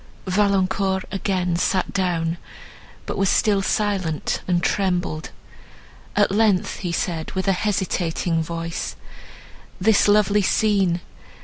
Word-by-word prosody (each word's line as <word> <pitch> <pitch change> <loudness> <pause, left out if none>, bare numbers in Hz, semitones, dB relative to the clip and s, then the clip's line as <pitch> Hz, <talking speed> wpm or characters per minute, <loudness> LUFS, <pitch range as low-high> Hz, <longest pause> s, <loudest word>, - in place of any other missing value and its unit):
Valancourt 190 -1 +1
again 185 -3 -1
sat 185 +2 0
down, 170 -3 0 0.7
but - - -4
was 195 -1 +3
still 205 -3 +3
silent, 195 -6 -1
and 175 -1 +1
trembled. 180 -5 -1 0.9
At 205 -2 +3
length 205 -3 +2
he 180 -3 -3
said, 170 -2 -2
with 190 0 -2
a - - +5
hesitating 180 -4 -1
voice, 165 +1 -4 0.8
"This 210 +2 +4
lovely 210 0 +4
scene! 195 -4 +2
190 Hz, 110 wpm, -22 LUFS, 175-200 Hz, 0.9 s, a